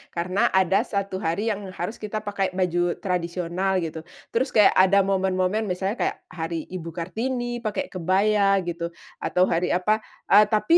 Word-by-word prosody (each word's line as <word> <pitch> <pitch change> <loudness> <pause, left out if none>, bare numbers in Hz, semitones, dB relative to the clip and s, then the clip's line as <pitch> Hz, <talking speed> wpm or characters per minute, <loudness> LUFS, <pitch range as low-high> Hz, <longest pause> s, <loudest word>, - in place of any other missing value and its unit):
karena 185 +3 +1
ada 190 0 +4
satu 200 -2 -2
hari 200 +7 -1
yang 205 - -3 0.2
harus 180 +6 -4
kita 215 0 -4
pakai 195 -3 -2
baju 175 -2 +1
tradisional 180 +1 -1
gitu, 160 0 -4 0.3
terus 255 +4 +1
kayak 210 -2 +7
ada 195 +1 +5
momen-momen 190 +2 0
misalnya 190 +5 -2
kayak - - 0
hari 165 -1 -4
Ibu 170 -3 -6
Kartini 240 +7 -3
pakai 215 -3 -3
kebaya 195 +3 +2
gitu 170 -1 -3 0.3
atau 180 - +1
hari 175 0 +1
apa, 210 +4 +2 0.3
eee 210 +1 +8
tapi 220 +11 +4
190 Hz, 155 wpm, -24 LUFS, 175-210 Hz, 0.3 s, eee